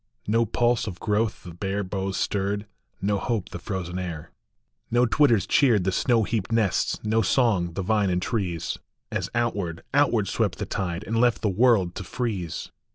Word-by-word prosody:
No 115 Hz, +2 st, +2 dB
pulse 120 Hz, +1 st, +1 dB
of 90 Hz, -4 st, -6 dB
growth 105 Hz, 0 st, 0 dB
the 85 Hz, -, -9 dB
bare 95 Hz, +3 st, -2 dB
boughs 95 Hz, 0 st, -3 dB
stirred, 100 Hz, +1 st, -1 dB, 0.4 s
no 100 Hz, 0 st, +1 dB
hope 110 Hz, -5 st, -2 dB
the 85 Hz, -, -7 dB
frozen 90 Hz, -1 st, -4 dB
air; 85 Hz, -3 st, -5 dB, 0.6 s
No 120 Hz, +1 st, +4 dB
twitters 120 Hz, -4 st, +3 dB
cheered 115 Hz, -9 st, +4 dB
the 95 Hz, -, +1 dB
snow 115 Hz, +3 st, +2 dB
heaped 110 Hz, -1 st, -2 dB
nests, 110 Hz, -4 st, +1 dB
no 110 Hz, +1 st, +2 dB
songs 95 Hz, -7 st, +2 dB
the 95 Hz, -, -2 dB
vine 105 Hz, 0 st, +2 dB
and 90 Hz, 0 st, +1 dB
trees, 90 Hz, -6 st, -2 dB, 0.3 s
As -, -, -2 dB
outward, 100 Hz, -8 st, -1 dB
outward -, -, +3 dB
swept -, -, 0 dB
the -, -, -3 dB
tide, 90 Hz, -1 st, -3 dB
and 115 Hz, +1 st, 0 dB
left 120 Hz, -1 st, +2 dB
the 105 Hz, -, +3 dB
world 100 Hz, -3 st, +3 dB
to 95 Hz, -, -6 dB
freeze. 95 Hz, -6 st, -3 dB
100 Hz, 175 wpm, -25 LUFS, 90-115 Hz, 0.6 s, No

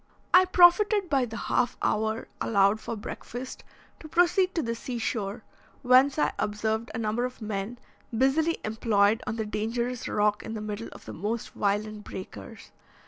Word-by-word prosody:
I 370 Hz, +1 st, +8 dB
profited 370 Hz, +2 st, +5 dB
by 270 Hz, -3 st, +3 dB
the 225 Hz, -1 st, -7 dB
half 245 Hz, 0 st, 0 dB
hour 220 Hz, +1 st, -1 dB
allowed 200 Hz, 0 st, +3 dB
for 230 Hz, -, -5 dB
breakfast 245 Hz, +4 st, -7 dB, 0.4 s
to 310 Hz, -, -10 dB
proceed 360 Hz, +3 st, +3 dB
to 330 Hz, -, 0 dB
the 230 Hz, -1 st, -2 dB
sea 240 Hz, +1 st, -5 dB
shore, 215 Hz, -2 st, -3 dB, 0.4 s
whence 260 Hz, +3 st, +5 dB
I 300 Hz, -, +2 dB
observed 220 Hz, +2 st, -1 dB
a -, -, -2 dB
number 225 Hz, +2 st, -1 dB
of 250 Hz, 0 st, -4 dB
men 215 Hz, +1 st, -4 dB, 0.3 s
busily 270 Hz, +8 st, +2 dB
employed 215 Hz, -1 st, +2 dB
on 220 Hz, -, -2 dB
the 220 Hz, -1 st, -2 dB
dangerous 230 Hz, +4 st, -2 dB
rock 210 Hz, 0 st, +1 dB
in 225 Hz, -, -6 dB
the -, -, -4 dB
middle 215 Hz, +1 st, -5 dB
of -, -, -13 dB
the -, -, -7 dB
most 215 Hz, +6 st, -3 dB
violent 210 Hz, +1 st, -1 dB
breakers. 190 Hz, -2 st, -9 dB
225 Hz, 165 wpm, -27 LUFS, 210-260 Hz, 0.4 s, I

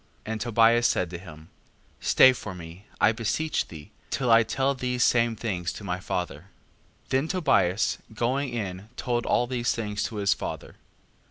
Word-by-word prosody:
5:9. 110 Hz, -, -4 dB
And 110 Hz, -1 st, -3 dB
Tobias 115 Hz, +1 st, +4 dB
said 90 Hz, -2 st, 0 dB
to 85 Hz, -, -6 dB
him: 80 Hz, -3 st, -12 dB, 0.5 s
Stay 130 Hz, -, +6 dB
for 100 Hz, -6 st, -7 dB
me, 85 Hz, +3 st, -11 dB
I 105 Hz, -, +5 dB
beseech 120 Hz, +8 st, -1 dB
thee, 75 Hz, -3 st, -11 dB, 0.2 s
till 125 Hz, -3 st, 0 dB
I 115 Hz, 0 st, +8 dB
tell 135 Hz, +4 st, 0 dB
these 125 Hz, -2 st, -1 dB
same 115 Hz, -1 st, +3 dB
things 95 Hz, -7 st, -3 dB
to -, -, -9 dB
my 90 Hz, -2 st, -3 dB
father. 90 Hz, -3 st, -4 dB, 0.6 s
5:10. -, -, -32 dB
Then 135 Hz, +4 st, +1 dB
Tobias 135 Hz, -, +2 dB
going 130 Hz, +5 st, -1 dB
in 100 Hz, -4 st, -5 dB
told 120 Hz, -1 st, -1 dB
all 120 Hz, -, +3 dB
these 120 Hz, -1 st, -1 dB
things 105 Hz, -2 st, -3 dB
to 115 Hz, -, -5 dB
his 100 Hz, -2 st, +2 dB
father. -, -, -7 dB
115 Hz, 175 wpm, -26 LUFS, 95-120 Hz, 0.6 s, I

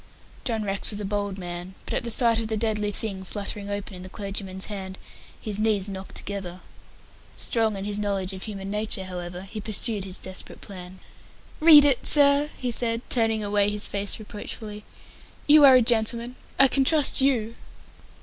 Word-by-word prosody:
John 225 Hz, -4 st, -2 dB
Rex 195 Hz, -1 st, -1 dB
was 205 Hz, -, -1 dB
a 205 Hz, -, -4 dB
bold 200 Hz, -1 st, -2 dB
man, 175 Hz, 0 st, -7 dB
but -, -, -5 dB
at -, -, -1 dB
the 235 Hz, -, -4 dB
sight 230 Hz, -1 st, +4 dB
of 225 Hz, -, -3 dB
the 220 Hz, 0 st, -2 dB
deadly 210 Hz, -1 st, 0 dB
thing 195 Hz, -2 st, -3 dB
fluttering 200 Hz, +1 st, -6 dB
open 200 Hz, -1 st, -5 dB
in 180 Hz, -, -9 dB
the 185 Hz, -, -9 dB
clergyman's 195 Hz, -2 st, -6 dB
hand, 190 Hz, -2 st, -6 dB, 0.4 s
his 210 Hz, -2 st, -5 dB
knees 210 Hz, -3 st, +1 dB
knocked 190 Hz, -1 st, -8 dB
together. 190 Hz, -3 st, -6 dB, 0.8 s
Strong 220 Hz, -3 st, +1 dB
in 195 Hz, -, -5 dB
his 205 Hz, 0 st, -3 dB
knowledge 195 Hz, -2 st, -2 dB
of 190 Hz, -, -8 dB
human 195 Hz, -2 st, -6 dB
nature, 210 Hz, -2 st, -1 dB
however, 180 Hz, -1 st, -7 dB
he 215 Hz, +2 st, -8 dB
pursued 215 Hz, -1 st, +1 dB
his 185 Hz, -1 st, -3 dB
desperate 190 Hz, 0 st, -6 dB
plan. 185 Hz, -1 st, -10 dB, 0.6 s
"Read 305 Hz, -2 st, +9 dB
it, 275 Hz, -4 st, +2 dB
sir," 285 Hz, 0 st, +5 dB
he 250 Hz, -2 st, -2 dB
said 230 Hz, 0 st, -1 dB
turning 225 Hz, -3 st, +1 dB
away 205 Hz, 0 st, +1 dB
his 205 Hz, 0 st, +3 dB
face 200 Hz, -1 st, 0 dB
reproachfully. 210 Hz, 0 st, -8 dB, 0.6 s
"You 300 Hz, 0 st, +7 dB
are 265 Hz, -2 st, +8 dB
a 250 Hz, -, +5 dB
gentleman. 235 Hz, +1 st, 0 dB, 0.2 s
I 275 Hz, -, +7 dB
can 270 Hz, +1 st, +2 dB
trust 295 Hz, -1 st, +3 dB
you." 235 Hz, -5 st, +1 dB
210 Hz, 180 wpm, -25 LUFS, 195-230 Hz, 0.8 s, Read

